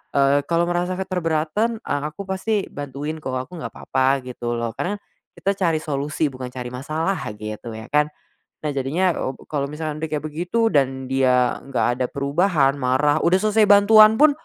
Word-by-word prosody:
eee, 140 0 +4
kalo 170 0 +2
ngerasa 175 +1 -1
keberatan, 185 +4 -1
eee, 145 - -2
aku 155 +6 -7
pasti 195 +2 -1
bantuin 145 +2 -5
kok 130 -4 -4
aku 130 +7 -5
nggak - - -6
papa, 135 0 +1
gitu 120 -1 -4
loh 115 -1 -2
karena, 200 +4 -1 0.4
kita 195 - 0
cari 165 -4 +2
solusi 145 0 -1
bukan 130 -1 -6
cari 125 -1 -6
masalah 155 +8 -2 0.2
gitu 110 +2 -7
ya 110 +1 -8
kan. 150 0 +3 0.6
Nah 150 - -1
jadinya 160 +7 +1
obu 130 - -5
kalau 140 -2 -2
misalkan 155 0 -4
dia 160 - -2
kayak - - -17
begitu 175 +9 0
dan 130 -2 +1
dia 125 -2 +2
gak 125 -2 0
ada 130 - +2
perubahan 140 0 +2
marah 140 +4 +2
udah 180 +2 +4
selesai 215 0 +4
bantuan 215 +2 +7
pun, 305 0 +7
150 Hz, 175 wpm, -22 LUFS, 130-180 Hz, 0.6 s, bantuan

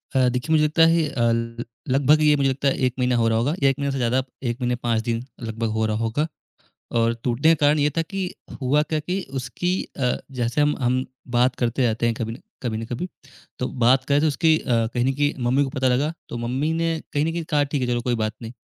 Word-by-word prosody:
अ, 130 -1 +4
देखिए, 125 +6 -3
मुझे 155 -1 +4
लगता 155 +2 +2
है 165 -2 +2
अ, 120 - -3
ल 115 +1 -2 0.3
लगभग 145 +4 +4
ये 150 -1 +5
मुझे 135 -1 +2
लगता 135 +1 -1
है, 135 - +2
1 125 - +1
महीना 125 0 +2
हो 115 -1 +2
रहा 110 0 +2
होगा, 135 +7 +1
1 135 +1 +3
महीने 140 0 0
से 135 - -2
ज़्यादा, 125 +1 +1 0.2
1 120 -1 -1
महीने 125 0 +1
5 115 -2 +1
दिन 115 +1 -2 0.2
लगभग 115 0 -3
हो 110 0 0
रहा 110 0 0
होगा, 115 +8 0 0.6
और 115 0 +2
टूटने 135 +7 +3
का 145 - +1
कारण 150 +1 +4
ये 145 +1 +3
था 165 - +4
कि 195 +4 -4 0.4
हुआ 140 +4 +3
क्या 155 -1 0
कि 180 +5 -2 0.2
उसकी 130 +8 -2 0.3
अ, 125 -2 +1 0.2
जैसे 120 +5 +1
हम 150 0 +2
हम 130 +1 +1 0.3
बात 125 +1 +3
करते 120 +2 -1
रहते 115 +1 -1
हैं 115 -1 +1
कभी 115 -1 -3
न - - -9 0.3
कभी 110 -3 -1
न 115 - -4
कभी, 125 +11 -4 0.5
तो 125 - -1 0.2
बात 130 +2 +5
करें 145 +1 +2
तो 160 - +3
उसकी 160 +1 +3
अ, - - -12
कहीं 120 +1 +1
न 135 - +2
कहीं 145 +1 +1
मम्मी 135 +4 +3
को 135 - -2
पता 130 0 0
लगा, 140 +6 +1 0.2
तो 120 - -5
मम्मी 130 +7 -1
ने 165 -1 0
कहीं 145 +1 +1
न 165 - 0
कहीं 170 0 -3
कहा, 150 -3 +1
"ठीक 140 -1 -2
है, 125 - 0
चलो 120 -1 0
कोई 120 0 0
बात 110 0 -1
नहीं।" 115 0 -7
130 Hz, 255 wpm, -23 LUFS, 120-150 Hz, 0.6 s, ये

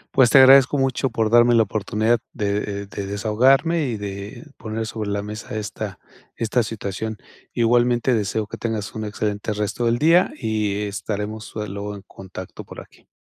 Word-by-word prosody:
Pues, 130 -3 +6
te 135 - +6
agradezco 135 +1 +7
mucho 135 0 0
por 115 -2 -1
darme 120 0 +6
la 115 - +5
oportunidad 110 +3 0
de, 105 -3 -1 0.3
eh, - - -10
de 100 0 -6
desahogarme 130 +11 +2
y 115 -3 -3
de 100 +6 -7
poner 110 0 -4
sobre 110 -2 -4
la 100 0 -2
mesa 105 +1 -7
esta 105 -2 -5 0.4
esta 115 +2 0
situación. 110 0 -4 0.4
Igualmente 120 +1 +2
deseo 110 0 -1
que - - -8
tengas 110 -3 -3
un 110 -1 -4
excelente 105 0 -3
resto 105 +3 -2
del 115 +1 +2
día 165 +6 +4
y 105 -2 -1
estaremos 105 +1 -4
luego 105 -1 -5
en 100 - -11
contacto 95 -2 -10
por - - -11
aquí. - - -16
110 Hz, 170 wpm, -22 LUFS, 105-120 Hz, 0.4 s, agradezco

